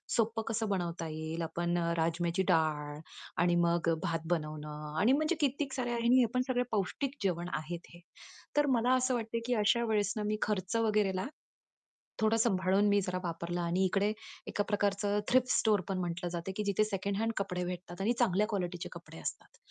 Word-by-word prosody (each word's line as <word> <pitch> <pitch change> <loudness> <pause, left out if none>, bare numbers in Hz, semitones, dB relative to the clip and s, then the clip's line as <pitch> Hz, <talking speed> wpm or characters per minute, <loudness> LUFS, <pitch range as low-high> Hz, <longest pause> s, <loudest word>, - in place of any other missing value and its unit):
सोपं 225 0 +1
कसं 220 -1 -1
बनवता 170 -3 -2
येईल? 160 +2 -4
आपण 170 +2 -1
अ, 170 0 0
राजम्याची 170 +3 +1
डाळ 150 -2 0 0.4
आणि 175 0 +3
मग 170 -1 +2
भात 165 -1 -2
बनवणं 150 0 -5
आणि 225 +6 +5
म्हणजे 310 +4 +2
कित्येक 280 0 0
साऱ्या 240 -2 -1
आणि 235 +2 +3
हे - - +6
आपण 250 +3 0
सगळं 250 -1 +1
पौष्टिक 255 +7 -1
जेवण 175 -2 0
आहेत 165 +3 -4
हे. - - -13 0.6
तर 295 - +5
मला 245 +3 +3
असं 255 0 +2
वाटतं, 230 0 -2
की 250 - +2
अशा 235 +3 +3
वेळेस 210 -3 +1
मी 215 0 0
खर्च 200 0 -1
वगैरेला 210 -2 +1 0.9
थोडं 220 +1 +3
सांभाळून 195 -2 +3
मी 205 0 +4
जरा 180 -1 -2
वापरलं 170 +1 -3
आणि 175 +3 +1
इकडे 200 +3 +2 0.4
एका 205 - 0
प्रकारचं 205 0 +1
थ्रिफ्ट 255 0 +4
स्टोअर 210 -3 +3
पण 190 - 0
म्हटलं 175 0 -2
जातं, 175 +2 -3
की 210 - 0
जिथे 200 +1 +2
सेकंड 200 -1 -2
हँड 225 +1 +1
कपडे 180 -2 -1
भेटतात 180 +1 -6
आणि 230 +5 +2
चांगल्या 210 -3 +3
क्वालिटीचे 180 -4 -3
कपडे 170 - -11
असतात - - -6
195 Hz, 180 wpm, -32 LUFS, 170-225 Hz, 0.9 s, हे